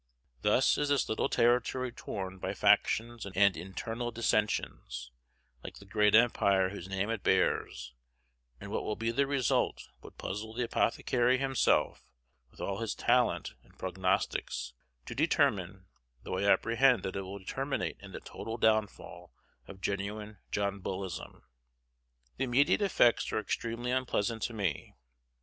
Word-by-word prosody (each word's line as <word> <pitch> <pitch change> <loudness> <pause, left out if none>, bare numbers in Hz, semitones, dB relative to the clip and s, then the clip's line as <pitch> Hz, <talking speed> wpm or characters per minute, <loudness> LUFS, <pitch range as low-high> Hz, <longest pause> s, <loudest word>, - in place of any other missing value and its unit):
Thus 105 +5 +3
is 145 -1 0
this 145 -2 +2
little 110 - 0
territory 125 +1 +2
torn 95 -5 -6
by - - -3
factions 115 +1 +2
and 95 -2 -8 0.2
internal 115 +7 -4
dissensions, 105 - -1 0.5
like - - -8
the 100 - -13
great 105 +1 +3
empire 100 -5 +4
whose 95 -2 -8
name 95 +3 -1
it 115 -3 -3
bears; 65 -9 0 0.7
and - - -8
what - - -1
will 105 - -2
be 115 +1 -1
the 140 +4 +1
result 135 -4 0
would - - -13
puzzle 110 +3 -5
the 125 - 0
apothecary 120 +2 +1
himself, 135 -1 +1 0.5
with - - -21
all - - -3
his - - -2
talent - - +1
at - - -24
prognostics, 95 -9 -1 0.3
to - - -6
determine, 105 - +1 0.4
though 95 - -3
I 100 +1 +4
apprehend 120 -1 +3
that 95 - -4
it 95 - -2
will 95 0 -8
terminate 135 +6 -2
in - - -11
the - - -7
total 115 +1 -6
downfall 110 -2 0 0.4
of 95 -1 -11
genuine 105 +1 -4
John 100 -1 -1
Bullism. 95 -1 -5 0.9
The 135 - 0
immediate 135 +9 +3
effects 155 - +3
are - - 0
extremely 115 +3 -3
unpleasant 120 -3 -1
to 120 - -2
me. 95 - -3
110 Hz, 145 wpm, -31 LUFS, 95-120 Hz, 0.9 s, empire